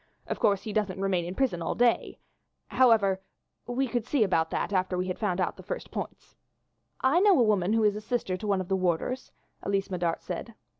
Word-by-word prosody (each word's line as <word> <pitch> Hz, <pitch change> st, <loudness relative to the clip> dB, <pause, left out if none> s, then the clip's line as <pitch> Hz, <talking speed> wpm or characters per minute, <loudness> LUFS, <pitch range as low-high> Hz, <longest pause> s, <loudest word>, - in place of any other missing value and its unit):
Of -, -, -4 dB
course 200 Hz, -2 st, +2 dB
he 215 Hz, -, -5 dB
doesn't 200 Hz, -3 st, -1 dB
remain 190 Hz, -3 st, 0 dB
in 180 Hz, +2 st, -5 dB
the -, -, -23 dB
prison 255 Hz, -11 st, +1 dB
all 165 Hz, -, -2 dB
day. 240 Hz, -1 st, +2 dB, 0.5 s
However, 215 Hz, -7 st, +4 dB, 0.5 s
we 255 Hz, +2 st, 0 dB
can 240 Hz, 0 st, -1 dB
see 255 Hz, 0 st, +2 dB
about 165 Hz, -5 st, +1 dB
that -, -, -2 dB
after 185 Hz, -1 st, +1 dB
we 180 Hz, +1 st, -1 dB
have 185 Hz, -, -4 dB
found 195 Hz, -4 st, 0 dB
out 185 Hz, -, -1 dB
the -, -, -9 dB
first -, -, -6 dB
points." -, -, -7 dB, 0.7 s
"I 270 Hz, +6 st, +4 dB
know 390 Hz, -4 st, +5 dB
a -, -, +6 dB
woman 210 Hz, -3 st, +2 dB
who 225 Hz, -1 st, +3 dB
is 210 Hz, 0 st, +1 dB
sister 215 Hz, -5 st, -1 dB
to 210 Hz, +3 st, -6 dB
one 195 Hz, -2 st, +2 dB
of 185 Hz, -, -6 dB
the 195 Hz, -, +1 dB
warders," 185 Hz, +8 st, -1 dB, 0.3 s
Elise 195 Hz, -1 st, -1 dB
Medart 175 Hz, -2 st, -1 dB
said. 200 Hz, +5 st, -6 dB
200 Hz, 215 wpm, -28 LUFS, 185-235 Hz, 0.7 s, a